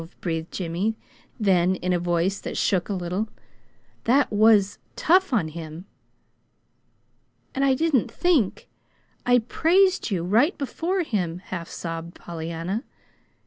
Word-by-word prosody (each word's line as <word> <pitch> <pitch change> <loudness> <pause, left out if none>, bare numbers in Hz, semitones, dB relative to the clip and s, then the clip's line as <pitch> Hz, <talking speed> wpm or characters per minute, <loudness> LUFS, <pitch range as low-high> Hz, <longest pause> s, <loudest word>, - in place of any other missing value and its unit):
breathed 165 -2 -3
Jimmy, 185 +5 -2 0.4
then, 185 -3 +3
in 180 0 -1
a 175 - +1
voice 175 +3 0
that - - -5
shook 185 -1 +1
a - - 0
little, 185 +4 -2 0.8
"That 260 +4 +3
was 210 -2 +4 0.2
tough 370 +2 +3
on 205 -10 +1
him!" 160 +2 -8 1.7
"And 270 - 0
I 270 -1 +4
didn't 305 -5 +1
think, 320 - +1 0.6
and 245 -2 +4
PRAISED 370 +4 +3
you, 185 -5 -1
right 225 - +3
before 345 +7 -1
him," 180 - -2
half 180 -2 -7
sobbed 165 0 -6
Pollyanna. 170 - -4
195 Hz, 125 wpm, -24 LUFS, 170-255 Hz, 1.7 s, was